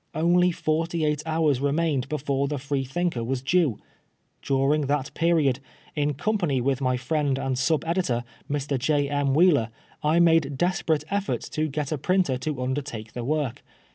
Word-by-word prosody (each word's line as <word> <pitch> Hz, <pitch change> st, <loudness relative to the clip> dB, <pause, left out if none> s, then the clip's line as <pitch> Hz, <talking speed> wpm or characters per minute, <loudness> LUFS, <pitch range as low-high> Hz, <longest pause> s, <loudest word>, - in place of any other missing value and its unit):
Only 175 Hz, +3 st, +3 dB
forty 165 Hz, -1 st, -1 dB
eight 150 Hz, -1 st, 0 dB
hours 155 Hz, -5 st, +1 dB
remained 145 Hz, -1 st, 0 dB
before 140 Hz, -2 st, -1 dB
the 145 Hz, +1 st, -2 dB
Freethinker 135 Hz, +1 st, -2 dB
was 125 Hz, +2 st, -2 dB
due. 145 Hz, -, +2 dB, 0.6 s
During 140 Hz, +2 st, +1 dB
that 140 Hz, -1 st, -1 dB
period, 155 Hz, -6 st, +2 dB, 0.4 s
in 145 Hz, -1 st, 0 dB
company 175 Hz, -6 st, 0 dB
with 135 Hz, +2 st, 0 dB
my 130 Hz, -1 st, +1 dB
friend 140 Hz, +1 st, 0 dB
and 135 Hz, -1 st, -1 dB
sub 140 Hz, +4 st, +1 dB
editor, 165 Hz, -9 st, 0 dB, 0.3 s
Mr. 140 Hz, -1 st, -1 dB
J. 145 Hz, +2 st, +1 dB
M. 145 Hz, -1 st, +1 dB
Wheeler, 150 Hz, -9 st, +4 dB, 0.3 s
I 155 Hz, +3 st, +3 dB
made 165 Hz, -5 st, +3 dB
desperate 165 Hz, -3 st, +1 dB
«£Eorts 200 Hz, 0 st, -2 dB
to 155 Hz, 0 st, 0 dB
get 150 Hz, 0 st, -3 dB
a 155 Hz, -, -1 dB
printer 180 Hz, -6 st, +1 dB
to 130 Hz, -1 st, -3 dB
undertake 130 Hz, -5 st, -4 dB
the 120 Hz, -, -4 dB
work. 145 Hz, -2 st, -1 dB
145 Hz, 160 wpm, -25 LUFS, 135-160 Hz, 0.6 s, Wheeler